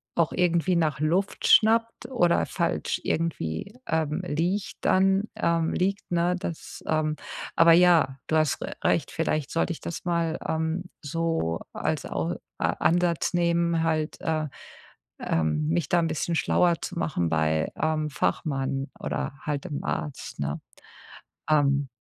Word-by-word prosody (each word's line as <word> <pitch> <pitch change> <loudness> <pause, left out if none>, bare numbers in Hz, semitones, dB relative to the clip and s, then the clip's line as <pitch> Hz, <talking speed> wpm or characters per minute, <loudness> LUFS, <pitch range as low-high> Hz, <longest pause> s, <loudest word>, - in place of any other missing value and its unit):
auch 170 -2 +2
irgendwie 180 0 +2
nach 155 -4 +1
Luft 175 +6 0
schnappt 230 +1 +4
oder 175 -9 +3
falsch - - -1
irgendwie, 165 - -2
ähm, 160 +1 0
liegt 180 +5 -1
dann 195 +2 +3
ähm, 170 -6 +1
liegt, 195 +2 -1
ne, 175 +1 +2
das, 170 -3 -6
ähm 155 -1 +1 0.4
aber 165 0 +7
ja, 165 -6 +5
du 160 - 0
hast 155 -3 +2
r - - -4
recht, - - +1
vielleicht 150 -2 -1
sollte 165 +1 0
ich - - -10
das 170 - -6
mal, 170 -2 0
ähm, 160 +3 -1 0.2
so 165 - -1
als - - -2
Au 85 +1 -2 0.3
A - - +1
Ansatz 175 0 +1
nehmen, 170 -1 +2
halt, 155 -1 -1
äh, 155 -1 -1 0.7
ähm, 75 -2 0
mich 85 +1 0
da 175 - +4
'n 165 - +1
bisschen 160 +2 -2
schlauer 170 +1 +2
zu 180 - -5
machen 90 - 0
bei, 80 -1 +1
ähm, 155 -1 0
Fachmann 135 -1 -1
oder - - -3
halt 145 0 -3
dem 150 -5 -4
Arzt, 145 - -4
ne, 70 +1 -2 0.9
ähm. 145 -2 +3
160 Hz, 145 wpm, -26 LUFS, 145-175 Hz, 0.9 s, aber